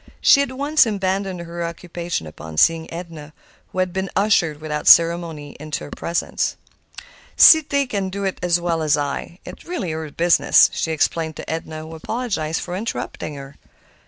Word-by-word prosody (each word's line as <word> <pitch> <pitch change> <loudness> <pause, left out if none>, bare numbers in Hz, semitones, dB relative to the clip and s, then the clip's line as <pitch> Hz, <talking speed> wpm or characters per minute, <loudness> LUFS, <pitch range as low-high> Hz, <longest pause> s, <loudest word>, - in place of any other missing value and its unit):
She 280 - +6
at 280 -2 -2
once 285 +1 +2
abandoned 195 -3 -2
her 170 0 -6
occupation 170 - -5
upon 80 0 -10
seeing 165 - +3
Edna, 165 -3 -9 0.3
who - - -13
had 185 -1 0
been 190 0 -2
ushered 190 -7 +2
without 150 -1 -4
ceremony 165 -3 +4
into 150 -1 -5
her - - -10
presence. 170 0 -2 0.8
"'Cité 285 -3 +6
can 200 -5 -2
do 200 +1 -5
it 190 -1 -2
as 175 -1 +2
well 170 -2 -1
as 150 -1 +2
I; 145 +4 -4
it - - -9
is - - -18
really 230 - -3
her 160 -1 -5
business," 170 +3 +4
she 160 - -2
explained 160 0 -1
to - - -9
Edna, 160 -1 -5
who 160 +1 -10
apologized 165 -3 -3
for 175 - -5
interrupting 190 -7 -5
her. 140 0 -11
170 Hz, 170 wpm, -21 LUFS, 155-190 Hz, 0.8 s, She